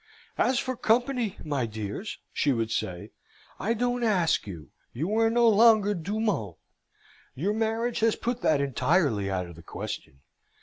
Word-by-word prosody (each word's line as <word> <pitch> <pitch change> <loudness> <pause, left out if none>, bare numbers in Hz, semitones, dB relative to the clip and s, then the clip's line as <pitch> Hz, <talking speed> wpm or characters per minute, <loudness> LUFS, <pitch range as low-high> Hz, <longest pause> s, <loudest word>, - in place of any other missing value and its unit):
"As 255 - +3
for 255 +1 -1
company, 240 -2 +1
my 140 -6 -1
dears," 110 - -5 0.2
she 145 - +2
would 115 -2 -1
say, 90 -4 -3 0.5
"I 230 +3 0
don't 245 +1 0
ask 180 - +2
you. 80 -7 -9 0.2
You 165 - -2
are 225 0 +4
no 235 +1 +4
longer 215 -1 +5
du 200 +4 -3
monde. 115 - -1 0.8
Your 185 +10 0
marriage 225 +2 -1
has 225 -1 +3
put 245 +1 -3
that 150 -3 +3
entirely 140 - +1
out 95 -1 -1
of 85 -1 -11
the 85 - -12
question." 70 -4 -7
195 Hz, 160 wpm, -27 LUFS, -, 0.8 s, longer